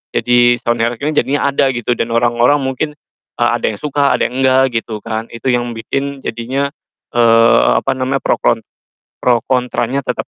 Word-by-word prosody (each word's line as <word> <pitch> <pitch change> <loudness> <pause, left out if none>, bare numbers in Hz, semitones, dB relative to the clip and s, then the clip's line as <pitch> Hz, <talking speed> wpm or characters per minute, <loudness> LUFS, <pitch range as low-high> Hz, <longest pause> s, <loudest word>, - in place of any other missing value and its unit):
Jadi, 120 0 +4
sound 120 0 -1
horeg, 120 +1 0
ini 155 +1 0
jadinya 140 0 +1
ada 135 0 +2
gitu, 120 0 -2
dan 115 - -1
orang-orang 120 +4 +3
mungkin, 140 +3 -3 0.4
eee, 120 -1 +2
ada - - -4
yang 110 - -4
suka, 145 +2 +1
ada - - 0
yang 130 +2 -4
enggak, 130 -1 +3
gitu 110 -1 -7
kan. 110 0 -4
Itu 125 +2 -2
yang 120 -1 -1
bikin 135 +4 -4
jadinya, 130 +5 -2 0.4
eee, 115 - +5 0.2
apa 135 - 0
namanya, 130 +1 -2
pro - - +1
kon - - +2 0.6
pro 120 -1 +3
kontranya 125 +1 0
tetep 125 - -3
125 Hz, 180 wpm, -16 LUFS, 120-135 Hz, 0.6 s, eee